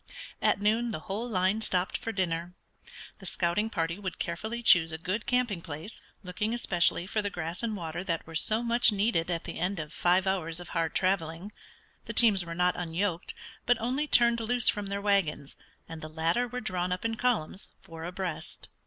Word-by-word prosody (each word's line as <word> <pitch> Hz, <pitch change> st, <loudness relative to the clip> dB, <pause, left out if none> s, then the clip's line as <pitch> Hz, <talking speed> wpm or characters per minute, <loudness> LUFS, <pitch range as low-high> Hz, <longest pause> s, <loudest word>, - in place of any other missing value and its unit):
At -, -, +3 dB
noon 220 Hz, +4 st, +2 dB
the 205 Hz, -8 st, -4 dB
whole 215 Hz, +8 st, -4 dB
line 190 Hz, +1 st, +1 dB
stopped 185 Hz, -3 st, 0 dB
for 225 Hz, -, -3 dB
dinner. 175 Hz, -3 st, -2 dB, 0.6 s
The 190 Hz, -, -9 dB
scouting 175 Hz, +7 st, 0 dB
party 165 Hz, -2 st, -2 dB
would 190 Hz, -3 st, -4 dB
carefully 220 Hz, +8 st, -3 dB
choose 170 Hz, -7 st, +6 dB
a 160 Hz, -, -3 dB
good 185 Hz, +7 st, -3 dB
camping 245 Hz, -8 st, +1 dB
place, 165 Hz, +5 st, -8 dB, 0.2 s
looking 210 Hz, +5 st, -2 dB
especially 175 Hz, -6 st, +2 dB
for 215 Hz, +3 st, -1 dB
the 205 Hz, -, -2 dB
grass 170 Hz, -2 st, -4 dB
and 225 Hz, -2 st, -1 dB
water 170 Hz, -2 st, -4 dB
that 165 Hz, -3 st, -1 dB
were 165 Hz, -, -11 dB
so 215 Hz, +8 st, +1 dB
much 235 Hz, 0 st, +5 dB
needed 200 Hz, -5 st, +1 dB
at 170 Hz, -2 st, -1 dB
the -, -, -6 dB
end 185 Hz, +3 st, 0 dB
of 155 Hz, -1 st, -6 dB
five 180 Hz, +2 st, +3 dB
hours 175 Hz, -4 st, 0 dB
of 175 Hz, -, -9 dB
hard 165 Hz, -2 st, -1 dB
traveling. 185 Hz, 0 st, 0 dB, 0.5 s
The -, -, -5 dB
teams 210 Hz, -6 st, +4 dB
were 170 Hz, -1 st, -6 dB
not 180 Hz, +1 st, +2 dB
unyoked, 175 Hz, +1 st, -1 dB, 0.3 s
but 245 Hz, 0 st, +4 dB
only 260 Hz, +6 st, 0 dB
turned 235 Hz, -3 st, +5 dB
loose 240 Hz, +1 st, +3 dB
from 205 Hz, -1 st, -1 dB
their 200 Hz, 0 st, -3 dB
wagons, 175 Hz, -8 st, +1 dB, 0.3 s
and 165 Hz, -1 st, -8 dB
the 155 Hz, -, -6 dB
latter 165 Hz, +10 st, +1 dB
were 250 Hz, +1 st, -5 dB
drawn 185 Hz, -4 st, -2 dB
up 180 Hz, +4 st, -2 dB
in 225 Hz, -, +1 dB
columns, 220 Hz, -7 st, 0 dB
four 165 Hz, -1 st, -9 dB
abreast. 180 Hz, -1 st, -5 dB
185 Hz, 195 wpm, -29 LUFS, 170-220 Hz, 0.6 s, choose